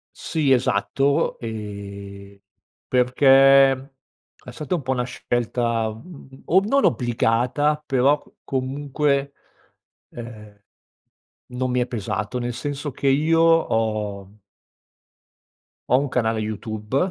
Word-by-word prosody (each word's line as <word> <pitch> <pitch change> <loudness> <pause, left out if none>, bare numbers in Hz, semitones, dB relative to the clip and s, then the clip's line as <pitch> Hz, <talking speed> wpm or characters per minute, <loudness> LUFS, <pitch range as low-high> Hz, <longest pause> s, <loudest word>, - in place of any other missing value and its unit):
Sì 150 -4 -1
esatto, 125 +3 +1
ehm, 100 -3 -8 0.5
perché 135 +2 +5
è 135 0 -15
stata 155 +4 -3
un 170 - -3
po' 130 -1 -3
una 125 -2 0
scelta 120 -2 -1
o 140 +6 -2
non 275 +6 +2
obbligata 125 +5 +1
però 135 +2 +2
c - - -24 0.2
comunque, 140 +1 -1 0.8
ehm, 105 -3 -11 0.9
non 125 0 -2
mi 125 - +1
è 120 - -1
pesato. 105 0 -3
Nel 120 0 -3
senso 145 +3 -4
che 140 +2 -3
io 155 +4 +3
ho 110 -11 +1 1.6
ho 125 - +5
un 145 - -1
canale 115 -3 0
YouTube, 110 +1 -5
125 Hz, 105 wpm, -22 LUFS, 110-140 Hz, 1.6 s, perché